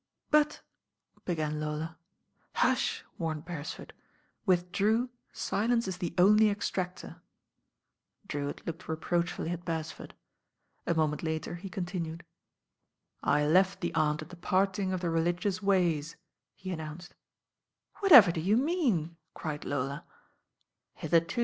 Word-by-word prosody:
'* - - -48
"But 300 0 +3 0.3
" - - -36
began 155 -3 -1
Lola. 155 +2 -4 0.6
"Hush - - +1
I" - - -29
warned 160 -2 -3
Beresford. 165 -4 -6 0.5
"With 180 -1 +2
Drew 220 +6 +2 0.2
silence 230 +2 0
is 185 -1 -4
the 175 -2 -3
only 210 +4 +6
extractor." 185 -3 -3 1.0
Drewitt 145 -5 -4
looked 170 +2 -6
reproachfully 170 +1 -1
at 175 0 -4
Beresford. 165 -2 -5 0.7
A 170 - +2
moment 155 -2 +1
later 160 0 -3
he 180 +3 -7
continued. 175 -2 -4 1.0
"I 150 +1 +2
left 185 +5 +3
the 175 - -2
'Aunt 155 -1 +1
at 155 - -14
the 180 - -10
parting 190 +2 +1
of 185 -1 -2
the 170 -2 -1
religious 175 +3 0
ways," 175 -6 +1 0.4
he 185 0 -6
announced. 160 +1 -7 0.9
"Whatever 260 - +9
do 165 - -3
you 200 +6 +3
mean?" 245 - +1 0.2
cried 150 -2 -5
Lola. 140 0 -2
175 Hz, 125 wpm, -30 LUFS, 160-195 Hz, 1.0 s, Whatever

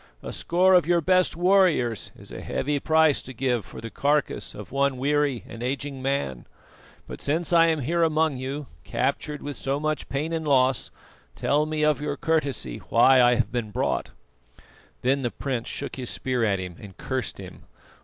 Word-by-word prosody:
A - - -6
score 185 +2 +3
of 180 -3 +5
your 175 0 +4
best 185 +2 +2
warriors 175 - +3
is - - -13
a - - -7
heavy 145 +1 -1
price 160 -1 +3
to 130 - -9
give 125 -2 0
for - - -11
the 115 - -7
carcase 145 0 0
of 105 -3 -9
one 140 0 +1
weary 145 -1 +1
and 115 - -9
aging 135 +2 -3
man. 135 - -2 0.6
But - - -8
since 160 +4 -1
I 165 -1 +6
am 160 -2 +1
here 170 +6 0
among 160 -3 +2
you, 135 +3 -4 0.2
captured 150 +1 -2
with 145 -1 -5
so 135 +1 -1
much 155 0 -2
pain 150 +4 -2
and 160 -2 -2
loss, 130 -2 +3 0.5
tell 150 +2 +1
me 155 0 -1
of 150 -2 +2
your 145 -1 -2
courtesy 140 - -1
why 130 +3 +6
I 120 0 +5
have 120 - 0
been 120 -3 -2
brought." - - -1 0.9
Then 135 +2 +2
the 120 - 0
prince 125 -2 -4
shook 140 - -5
his 125 -2 -4
spear 125 -2 -1
at 100 -3 +2
him 90 -2 -7
and 100 -3 -12
cursed - - -3
him. - - -11
140 Hz, 185 wpm, -25 LUFS, 125-155 Hz, 0.9 s, I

